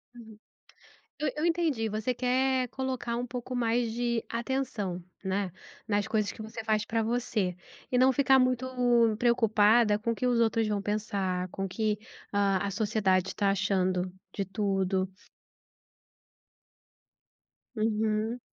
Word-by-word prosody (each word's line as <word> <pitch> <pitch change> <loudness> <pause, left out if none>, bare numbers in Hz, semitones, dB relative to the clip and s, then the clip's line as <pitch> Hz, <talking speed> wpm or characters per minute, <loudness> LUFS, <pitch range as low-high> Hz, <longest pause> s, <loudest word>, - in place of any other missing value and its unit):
Uhum, 220 -3 -12 0.8
eu 295 -3 0
eu 310 - 0
entendi, 325 -10 +1
você 215 +4 -1
quer 255 +1 +1
colocar 260 -3 -3
um 245 - -2
pouco 250 +1 -5
mais 235 -1 +1
de 235 0 -1
atenção, 230 -7 -2 0.2
né, 190 -1 -1 0.4
nas 205 0 +1
coisas 215 -2 0
que - - -10
você 220 +1 -7
faz 215 -1 +1
pra 225 0 0
você, 220 -6 -1 0.4
e 250 - +2
não 260 +1 +6
ficar 265 0 +4
muito 255 0 +2 0.5
preocupada 220 -2 +4
com 230 +2 -1
o 230 - -2
que 250 - -2
os 245 -1 +2
outros 225 -1 +2
vão 205 -1 -1
pensar, 200 -3 -1
com 195 +1 -4
o - - -5
que 210 +1 -1 0.3
a 200 -1 +1
a - - -3
sociedade 195 -3 +1
está 200 -1 +1
achando 185 -2 0 0.2
de 200 - -2
tudo. 195 -1 0 2.7
Uhum. 220 +1 0
220 Hz, 140 wpm, -29 LUFS, 200-245 Hz, 2.7 s, não